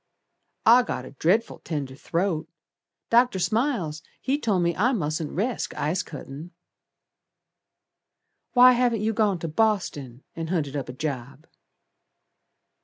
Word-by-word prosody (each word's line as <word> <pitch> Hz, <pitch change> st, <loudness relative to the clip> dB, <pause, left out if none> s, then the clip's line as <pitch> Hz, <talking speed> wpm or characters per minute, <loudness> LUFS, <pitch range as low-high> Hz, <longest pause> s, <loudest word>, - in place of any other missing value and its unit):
"I 235 Hz, +3 st, +8 dB
got 130 Hz, -, -4 dB
a -, -, -10 dB
dret'ful 185 Hz, -, +1 dB
tender 145 Hz, -5 st, -4 dB
throat; 170 Hz, +3 st, -2 dB, 0.6 s
Dr. 240 Hz, -3 st, +4 dB
Smiles 200 Hz, -, 0 dB, 0.2 s
he 275 Hz, +2 st, -1 dB
told 200 Hz, -9 st, +1 dB
me 170 Hz, -1 st, +1 dB
I 235 Hz, -, +2 dB
mustn't 155 Hz, -, -2 dB
resk 225 Hz, +7 st, -2 dB
ice 155 Hz, +5 st, 0 dB
cuttin'." 150 Hz, +2 st, -9 dB, 2.0 s
"Why 250 Hz, 0 st, +8 dB
haven't 240 Hz, -3 st, +2 dB
you 220 Hz, +1 st, 0 dB
gone 210 Hz, -3 st, +2 dB
to 165 Hz, -, -5 dB
Boston, 155 Hz, -, -1 dB
And 165 Hz, -1 st, -4 dB
hunted 150 Hz, -6 st, -1 dB
up 135 Hz, -3 st, -4 dB
a -, -, -5 dB
job?" 140 Hz, +1 st, -5 dB
175 Hz, 125 wpm, -25 LUFS, 150-225 Hz, 2.0 s, I